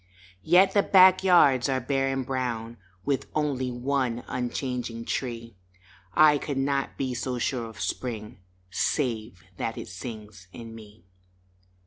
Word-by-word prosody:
Yet 180 - +5
the 200 - +5
back 185 -1 +6
yards 140 -9 +5
are 130 -1 +1
bare 135 +1 0
and 135 -1 -2
brown 120 -3 -3 0.3
With 140 -2 -1
only 140 -4 0
one 125 -1 -1
unchanging 125 -2 -3
tree 115 -3 -4 0.6
I 150 -2 +6
could 140 -1 -4
not 135 0 -1
be 130 -2 -2
so 125 +1 -3
sure 120 -1 -2
of 110 -2 -13
Spring 105 +2 -4 0.3
Save 110 - -1
that - - -3
it - - -7
sings 105 -2 -9
in 115 +1 -9
me. 110 -2 -14
125 Hz, 135 wpm, -26 LUFS, 115-140 Hz, 0.6 s, back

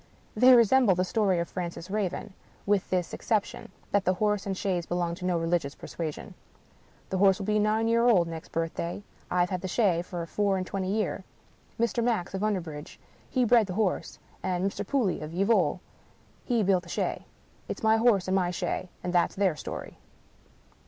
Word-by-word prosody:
They 250 +4 +7
resemble 235 -3 +5
the 180 - +1
story 195 -1 +1
of 170 0 -1
Francis 175 0 -6
Raven 205 0 -2 0.2
— - - -31
^with 200 -2 +1
this 180 -2 -1
ex - - -9
ception, 215 -3 0 0.2
that 200 -1 +2
the 185 0 +1
horse 210 0 0
and 195 -1 -2
chaise 180 -4 -1
belong 175 -1 -1
to 180 +1 -7
no 180 -1 +1
religious 165 -3 -1
persuasion. 160 -3 -6 0.4
" - - -32
The 190 - 0
horse 195 -1 +5
will 195 - -5
be 215 +1 +2
nine 215 +2 +2
year 230 +1 +3
old 185 -8 +4
next 165 -1 -8
birth 165 0 -2
day. 170 +4 -4 0.3
I've 180 0 +1
had 185 -1 -2
the 190 - -3
shay 185 -4 +2
for 175 -1 -5
four 200 +2 0
and 185 - -2
twenty 190 0 -3
year. 210 -2 -1 0.6
Mr. 235 0 +1
Max, 220 -7 0
of 190 - -3
Underbridge, 170 -8 -3 0.3
he 255 -2 +2
bred 230 -2 +4
the 180 - -5
horse; 210 -3 -1 0.2
and 185 -1 -1
Mr. 195 - -2
Pooley, 245 - 0
of 155 +2 -7
Yeovil, 200 +5 +2 0.6
he 235 -4 +1
built 190 -2 +3
the 175 - -15
shay. - - -2 0.4
It's - - -6
my 220 0 +5
horse 220 -5 +3
and 185 - 0
my 185 -2 +2
shay. 180 +1 -3
And 180 0 -3
that's 175 -1 +2
their 190 -4 +2
story - - -7
190 Hz, 200 wpm, -28 LUFS, 175-215 Hz, 0.6 s, They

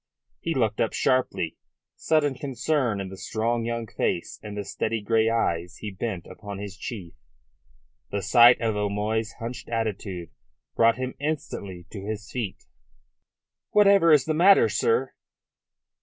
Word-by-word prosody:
He 165 -1 -2
looked 110 -5 +1
up 115 - +1
sharply, 130 -10 0 0.4
sudden 150 -3 +2
concern 130 -4 -1
in 95 -1 -4
the 95 - -9
strong 115 +3 -1
young 115 0 -2
face - - -2
and 105 -1 -7
the 100 - -2
steady 110 +3 -2
grey 110 +2 +2
eyes 90 -6 -1
he 105 - -6
bent 95 -2 -4
upon 100 -2 -8
his 100 -1 -7
chief. 100 -6 -7 1.0
The 100 -1 -3
sight 120 +4 +7
of 110 -2 0
O'Moy's 105 +2 -1
hunched 120 +1 -7
attitude 100 -6 -3 0.4
brought 115 +1 +4
him 130 0 -3
instantly 100 - -4
to 100 -3 -7
his 105 +1 -5
feet. 115 -7 -4 1.1
"Whatever 200 -5 +5
is 150 -4 +5
the 155 - 0
matter, 185 +5 +6
sir?" 460 0 +1
115 Hz, 140 wpm, -26 LUFS, 100-130 Hz, 1.1 s, sight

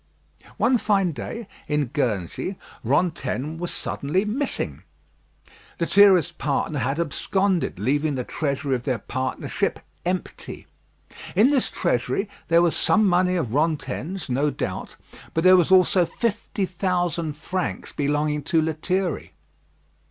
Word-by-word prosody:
One 255 -2 +3
fine 195 -5 +2
day, 225 +8 -6 0.2
in 150 -1 +1
Guernsey, 115 - -2 0.3
Rantaine 145 +1 0
was 175 0 -3
suddenly 170 +9 -1
missing. 260 +7 -2 1.0
Lethierry's 185 0 +5
partner 150 -1 -1
had 135 +6 -1
absconded, 180 - 0
leaving 145 +8 +1
the 125 - -2
treasury 140 0 -2
of 125 - 0
their 125 -1 -1
partnership 130 +4 -2 0.2
empty. 180 +1 -4 0.7
In 240 +7 +5
this 270 -4 +2
treasury 125 - 0 0.2
there 170 +1 +5
was 170 - +2
some 215 0 +3
money 180 -1 +3
of 145 -11 -1
Rantaine's, 155 +3 -1
no 140 +3 +1
doubt, - - -4 0.4
but 165 - +1
there 185 0 +8
were 180 -2 +5
also 185 -1 +5
fifty 225 -3 -2
thousand 175 -3 -1
francs 185 +3 -3
belonging 150 +1 0
to 165 - +2
Lethierry. 165 +3 -1
165 Hz, 120 wpm, -24 LUFS, 145-185 Hz, 1.0 s, there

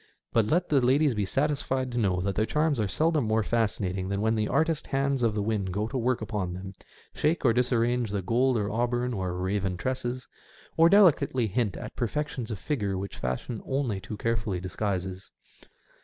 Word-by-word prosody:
But 115 -2 +3
let 175 +7 +1
the 140 -3 +4
ladies 135 +3 +3
be 105 -2 -1
satisfied 135 +1 -1
to 120 - -1
know 95 -5 +1
that 100 +1 -1
their 110 +3 0
charms 150 -3 +1
are 105 - +1
seldom 155 - +1
more 110 0 +2
fascinating 100 -5 -1
than 100 0 -1
when 110 +2 +2
the 110 -1 0
artist 160 +1 0
hands 135 -1 0
of 115 -3 +1
the 105 - 0
winds 105 -3 -1
go 105 +4 -1
to 135 - -8
work 125 -1 +1
upon 105 -5 -3
them, 95 +1 -7 0.4
shake 155 0 0
or 115 - +5
disarrange 120 -1 +1
the 100 -2 -2
gold 125 +5 +2
or 105 -1 -1
auburn 120 +2 0
or 95 -4 -3
raven 95 0 -1
tresses, 125 +2 -3 0.5
or 165 +1 +6
delicately 150 - +4
hint 110 -1 -1
at - - -8
perfections 130 -1 -2
of 110 - -3
figure 100 -7 -2
which 100 +1 -5
fashion 65 - -3
only 130 -7 -1
too 105 +2 -7
carefully 110 -4 -1
disguises. 95 0 -3
115 Hz, 190 wpm, -27 LUFS, 100-130 Hz, 0.5 s, or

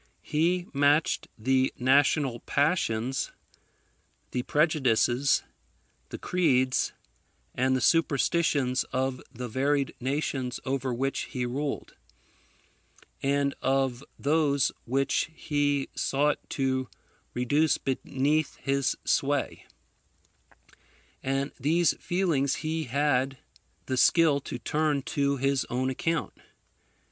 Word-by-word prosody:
He 175 +4 +1
matched 145 +2 +2
the 130 +3 +2
national 135 0 +3
passions, 130 -5 0 1.0
the 125 - -1
prejudices, 135 -3 +2 0.7
the - - -6
creeds, 130 -8 +1 0.6
and 130 +1 +1
the 130 - 0
superstitions 145 -3 +2
of 130 0 -2
the 125 -1 -6
varied 140 +3 0
nations 130 -1 -2
over 130 -1 -1
which 135 +3 -1
he 125 -1 -3
ruled, 140 +4 -3 1.3
and 140 0 +1
of 135 -1 0
those 145 -2 +2
which 135 +5 0
he 145 -3 0
sought 145 +2 +1
to 130 -2 -1 0.5
reduce 145 +5 +2
beneath 140 +3 -1
his 140 -1 0
sway: - - 0 1.5
and 135 +1 -1
these 160 +5 +3
feelings 165 -7 0
he 160 0 -1
had 135 0 +1 0.5
the 130 - -2
skill 155 +1 +4
to 125 - -6
turn 150 +1 0
to 140 0 0
his 135 0 +1
own 130 +2 0
account. 165 +4 -2
135 Hz, 95 wpm, -28 LUFS, 130-150 Hz, 1.5 s, skill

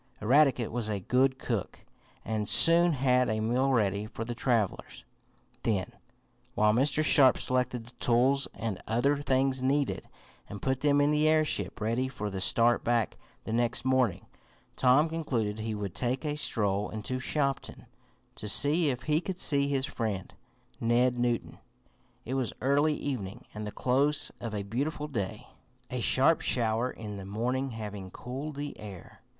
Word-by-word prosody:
Eradicate 130 0 +3
was 115 -2 -3
a 105 -2 -2
good 130 +6 +1
cook, 115 -7 -4 0.4
and 110 -1 -2
soon 170 +1 +5
had 125 -2 +2
a 110 0 -1
meal 125 +5 +1
ready 105 -3 +1
for 115 0 -6
the 120 - -4
travelers. 115 -4 -2 0.6
Then, 105 0 -1 0.6
while 105 0 +3
Mr. 140 +5 +3
Sharp 135 -4 +6
selected 125 -2 -1
the 120 - -14
tools 130 +3 +2
and 110 -5 -4
other 135 +6 +1
things 130 -1 +1
needed, 140 +1 0 0.4
and 100 - -7
put 130 +2 -1
them 145 -1 +3
in 145 +1 +3
the 150 +1 +2
airship 155 -1 +1
ready 115 +4 0
for 105 -6 -5
the 95 -1 -4
start 115 +4 +3
back 120 -3 0 0.3
the 110 - -5
next 120 +2 0
morning, 130 -8 +1 0.5
Tom 130 +5 +4
concluded 125 -10 -2
he 110 0 -3
would 100 -3 -5
take 125 +3 -2
a 150 -1 -1
stroll 105 -8 -1
into 110 +4 -4
Shopton, 140 +1 -2 0.5
to 105 - -6
see 150 - +3
if 125 -1 -3
he 155 +2 +1
could 185 0 -5
see 140 -5 +3
his 135 -2 0
friend, 105 -8 -4 0.5
Ned 120 +2 +2
Newton. 120 -1 -1 0.7
It 125 - -4
was 130 -3 -1
early 145 +4 +2
evening, 120 -5 -5
and 105 0 -5
the - - -5
close 140 +6 +2
of 115 -3 -5
a 100 - -3
beautiful 145 +9 -3
day, 110 -6 -4 0.5
a 125 - -2
sharp 135 +6 +3
shower 115 0 0
in 105 -4 -7
the 95 - -8
morning 125 +7 -2
having 105 -5 -7
cooled 135 - -7
the 145 0 -5
air. 100 -5 -11
125 Hz, 160 wpm, -29 LUFS, 110-140 Hz, 0.7 s, Sharp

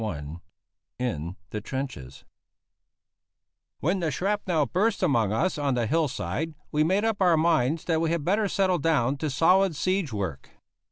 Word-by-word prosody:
V 75 -6 -5 0.6
IN 90 -9 -3 0.2
THE 105 - -4
TRENCHES 120 - -6 1.6
When 180 +6 +1
the 165 -3 0
shrapnel 180 -1 0
burst 195 - 0
among 115 - +2
us 150 +10 0
on 140 -3 0
the 120 -2 0
hill 160 +5 +1
side 155 +4 -4 0.2
we 150 0 +2
made 190 +7 +1
up 225 -3 -1
our 175 -3 +5
minds 155 -2 +2
that 165 -2 +1
we 165 - +1
had 165 -3 -1
better 205 +3 +2
settle 190 -2 +1
down 140 -4 +1
to 155 +2 -2
solid 180 +5 +3
siege 185 -2 0
work. 95 -10 -4
155 Hz, 160 wpm, -26 LUFS, 125-180 Hz, 1.6 s, our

